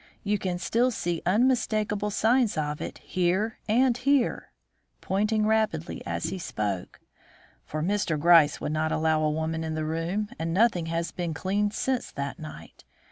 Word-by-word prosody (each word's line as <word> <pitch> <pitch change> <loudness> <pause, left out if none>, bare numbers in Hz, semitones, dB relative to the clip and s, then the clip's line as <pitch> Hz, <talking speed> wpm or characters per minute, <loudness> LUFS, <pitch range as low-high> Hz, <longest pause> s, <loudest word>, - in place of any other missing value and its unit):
You 205 0 0
can 180 -2 -2
still 235 +7 +1
see 175 -8 -2
unmistakable 215 -2 +1
signs 225 +1 +2
of 150 -1 -2
it - - -5
here 185 +5 -1
and 245 +2 +4
here" 270 0 +1 0.5
(pointing 215 +2 0
rapidly 215 -7 0
as - - -3
he 185 +1 -4
spoke), 105 - -4 0.7
"for 155 0 -3
Mr. 185 -4 0
Gryce 165 -2 +6
would - - -3
not 155 +1 0
allow 155 0 +2
a 155 - +2
woman 160 +1 -2
in 160 -1 -3
the 155 0 -2
room, 170 +7 -2
and 165 +1 -2
nothing 190 -6 +3
has 165 +1 -2
been 170 -3 -3
cleaned 205 +5 0
since 260 -2 -1
that 140 0 -4
night. 75 +1 -10
180 Hz, 160 wpm, -27 LUFS, 160-215 Hz, 0.7 s, Gryce